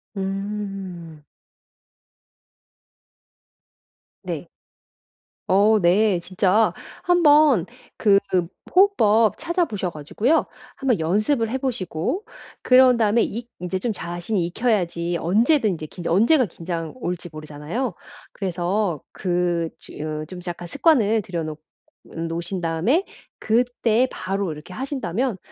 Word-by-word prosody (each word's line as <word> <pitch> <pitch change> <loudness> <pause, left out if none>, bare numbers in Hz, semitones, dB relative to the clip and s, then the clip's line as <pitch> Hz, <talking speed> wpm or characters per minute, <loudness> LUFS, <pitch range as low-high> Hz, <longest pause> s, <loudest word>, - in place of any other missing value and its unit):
음. 195 -5 -5 3.0
네. - - -5 1.0
어 205 +3 +5
네. 185 +2 +3
진짜 190 +4 +2 0.3
한번 300 - +5 0.3
그 205 -2 +5 0.6
호흡법 230 - +4
찾아 345 +1 0
보셔 205 - -3
가지고요 205 - 0 0.3
한번 255 -9 +1
연습을 215 - +1
해 260 - -1
보시고 245 - -2 0.4
그런 255 0 +6
다음에 225 0 +3
이 235 +2 -4
이제 180 +1 -2
좀 225 +5 -2
자신이 175 0 -2
익혀야지 175 -5 0
언제든지 210 - +2
긴장 175 -1 -3
언제가 245 - +4
긴장 165 -2 -5
올지 180 -8 -4
모르잖아요? 155 - -4 0.4
그래서 180 -2 -1
그 175 -2 -1
즈 - - -13
으 155 0 -4 0.2
약간 175 0 -5
습관을 225 - +3
들여놓 165 -5 -4 0.5
놓으신 170 +2 -4
다음에 175 - +1 0.3
그때 240 +1 +2
바로 195 -1 -2
이렇게 150 +4 -11
하신다면 255 - -2
195 Hz, 220 characters per minute, -23 LUFS, 170-235 Hz, 3.0 s, 그런